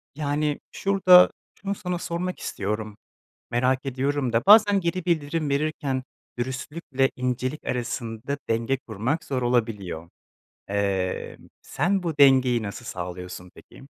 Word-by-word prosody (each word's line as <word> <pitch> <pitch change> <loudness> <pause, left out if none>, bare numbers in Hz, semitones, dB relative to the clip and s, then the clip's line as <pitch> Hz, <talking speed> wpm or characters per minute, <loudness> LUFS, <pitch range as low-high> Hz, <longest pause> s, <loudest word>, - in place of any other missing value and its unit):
yani, 150 0 -1
şurada 185 -2 +6 0.3
şunu 200 0 -2
sana 180 -3 -3
sormak 180 +2 -3
istiyorum, 105 +1 -4 0.5
merak 130 +3 +1
ediyorum 135 0 -1
da 115 - +2
bazen 205 -1 +7
geri 170 0 -2
bildirim 155 -2 0
verirken 140 -2 -1 0.4
dürüstlükle 135 +2 -1
incelik 125 +3 -2
arasında 120 +1 -3
denge 115 +4 +1
kurmak 130 - -3
zor 130 -2 -2
olabiliyor. 105 -9 -1 0.6
Eee, 100 -2 -1 0.3
sen 185 +6 0
bu 160 -4 -3
dengeyi 130 -4 +5
nasıl 105 +3 -6
sağlıyorsun 90 -1 -7
peki? - - -16
130 Hz, 115 wpm, -25 LUFS, 115-155 Hz, 0.6 s, bazen